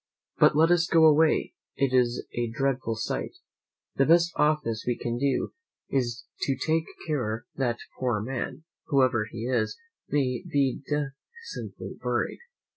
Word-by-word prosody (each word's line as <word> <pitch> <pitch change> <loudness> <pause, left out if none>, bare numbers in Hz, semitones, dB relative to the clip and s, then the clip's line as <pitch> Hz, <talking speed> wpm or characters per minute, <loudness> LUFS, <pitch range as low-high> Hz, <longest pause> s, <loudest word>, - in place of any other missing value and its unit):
But - - +6
let 160 +3 +5
us 175 -1 +4
go 165 -1 +5
away; 155 0 +4 0.2
it 135 -1 +1
is 125 -1 +2
a 120 0 -1
dreadful 130 -1 -1
sight! 110 - -3 0.6
The 135 - +4
best 170 +1 +5
office 150 -8 +1
we 120 - +1
can 120 0 -3
do 140 -1 0 0.4
is 120 -3 -1 0.2
to 135 - 0
take 160 0 +1 0.2
care 120 -7 -2
that 120 -3 0
the - - -11 0.2
poor 125 -4 +1
man, 130 +7 -4 0.2
whoever 130 -7 +3
he 115 0 -5
is, 120 -3 0 0.3
may 130 -4 +1
be 135 -3 0
decently 150 - -5
buried." - - -1
135 Hz, 145 wpm, -27 LUFS, 120-150 Hz, 0.6 s, But